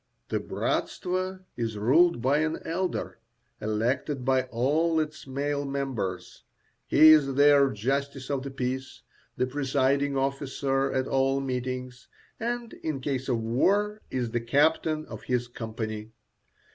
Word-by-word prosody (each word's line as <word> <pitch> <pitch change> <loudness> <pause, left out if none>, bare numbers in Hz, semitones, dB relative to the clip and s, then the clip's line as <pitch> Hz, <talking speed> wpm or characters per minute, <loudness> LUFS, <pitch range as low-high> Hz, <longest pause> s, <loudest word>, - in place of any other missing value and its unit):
The - - 0
bratstvo 185 0 -2
is 115 -3 -3
ruled 135 +6 +4
by 140 +3 +3
an 155 +1 0
elder, 180 +2 -2 0.4
elected 125 +5 -1
by 130 -1 +2
all 150 +7 +1
its 155 -2 -4
male 140 +2 -1
members. 130 -10 -4 0.4
He 155 +1 +7
is 145 -4 +6
their 145 -1 +6
justice 135 +4 -2
of 140 -2 0
the 140 - -5
peace, 130 0 -4 0.3
the 125 - +2
presiding 140 +1 +1
officer 135 0 0
at 130 0 0
all 135 0 +2
meetings, 125 -1 -4 0.3
and 240 0 -3
in 155 -4 -2
case 135 0 -3
of 120 -3 +1
war 205 - +1
is 125 -3 -2
the 120 0 -1
captain 155 +5 +2
of - - -9
his 125 -1 0
company. 110 -2 -5
135 Hz, 135 wpm, -27 LUFS, 125-150 Hz, 0.4 s, He